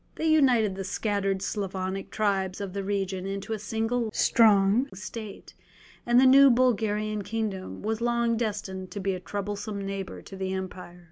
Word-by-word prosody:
They - - -3
united 255 -10 +4
the 195 0 -5
scattered 195 -1 -1
Slavonic 190 -1 -3
tribes 195 -3 -1
of 200 -2 -5
the 200 0 -3
region 195 -1 -2
into 195 +3 -4
a 215 - -3
single 225 +3 -1
strong 215 +4 +4
state, 210 +2 -8 0.5
and 240 +1 +5
the 265 - +6
new 275 +1 +8
Bulgarian 215 -4 +1
kingdom 205 -2 -4
was 220 +1 -2
long 235 -1 +1
destined 205 -4 -3
to 205 - -6
be 195 0 -1
a 185 - -4
troublesome 200 +2 -4
neighbour 195 -1 -5
to 195 - -10
the 190 0 -3
empire. 185 -2 -6
205 Hz, 160 wpm, -27 LUFS, 195-225 Hz, 0.5 s, new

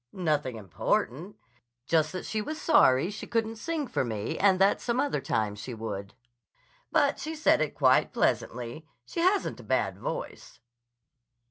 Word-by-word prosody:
"Nothing 150 -8 -1
important. 120 - -2 0.5
Just 155 -1 +2
that 185 - -5
she 215 - -2
was 310 +8 -5
sorry 135 - +4
she 210 - -7
couldn't 225 -1 -1
sing 315 +5 -2
for - - -1
me 110 -3 -3
and 195 -1 +4
that 195 +2 +3
some 240 +1 -1
other 285 - 0
time 105 -2 -1
she 110 +4 -7
would. 100 -2 -6 0.8
But 290 -3 +2
she 315 +1 -4
said 305 - +3
it 155 - -1
quite 130 -3 +4
pleasantly. 125 +6 -1 0.2
She - - -6
hasn't 375 +4 +1
a - - -10
bad - - 0
voice." - - -6
175 Hz, 155 wpm, -28 LUFS, -, 0.8 s, sorry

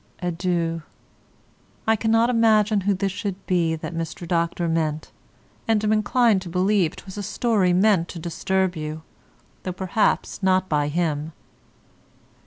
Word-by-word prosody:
Adieu. 170 -2 -1 1.0
I 220 - +4
cannot 225 +2 +2
imagine 215 -3 +3
who 200 +1 +1
this 195 +1 -1
should 200 -1 -5
be 170 -3 +1
that 160 - -6
Mr. 165 +1 -5
Dr. 170 0 0
meant, 155 -2 -1 0.6
and 220 -2 +2
am 215 0 +2
inclined 215 -1 +3
to 185 - -8
believe 185 -1 +1
'twas 195 +1 -9
a - - -2
story 205 -2 +1
meant 185 -2 +3
to 180 - -8
disturb 185 +3 -1
you, 155 0 -5 0.6
though 185 - -4
perhaps 190 +3 0
not 185 -1 +2
by 150 -3 +1
him. 155 -1 -1
185 Hz, 140 wpm, -23 LUFS, 165-210 Hz, 1.0 s, I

